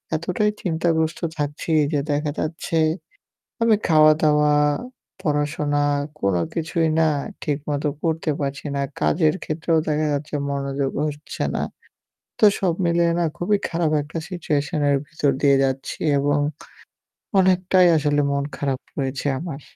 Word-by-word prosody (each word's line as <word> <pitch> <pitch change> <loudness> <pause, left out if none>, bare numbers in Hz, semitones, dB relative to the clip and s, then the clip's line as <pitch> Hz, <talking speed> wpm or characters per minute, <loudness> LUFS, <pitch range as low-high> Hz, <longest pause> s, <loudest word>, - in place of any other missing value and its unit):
এতটাই 180 +6 0
চিন্তাগ্রস্ত 160 -2 0 0.2
থাকছি 145 +2 -3 0.2
যে 145 - +2
দেখা 145 0 0
যাচ্ছে 165 +1 -2 0.9
আমি 230 -1 +5
খাওয়া-দাওয়া, 155 -1 +5 0.7
পড়া-শোনা 145 -1 0 0.4
কোন 100 -2 +1 0.2
কিছুই 165 0 0
না 160 - +4 0.3
ঠিক 145 -2 -1
মতো 145 +1 0
করতে 160 -1 0
পারছি 140 +1 -3
না। 140 - -1 0.2
কাজের 155 -1 +2
ক্ষেত্রেও 160 +1 0
দেখা 155 0 +1
যাচ্ছে 145 +1 -3 0.2
মনোযোগ 140 -1 -2
হচ্ছে 150 0 -5
না। - - -1 0.8
তো 215 - +6
সব 180 -3 +1
মিলিয়ে 170 0 +2
না 170 - +2
খুবই 205 +4 +1
খারাপ 165 -2 0
একটা 150 +3 -7
সিচুয়েশন 155 -4 -1
এর 140 - +3
ভিতর 145 -2 0
দিয়ে 140 -1 +5
যাচ্ছি। 135 0 -2 0.2
এবং 145 +1 +1 1.0
অনেকটাই 185 0 +4
আসলে 145 -1 +1
মন 140 0 0
খারাপ 135 -2 -2 0.2
হয়েছে 135 0 -2
আমার। 155 -4 -6
150 Hz, 130 wpm, -22 LUFS, 145-165 Hz, 1.0 s, তো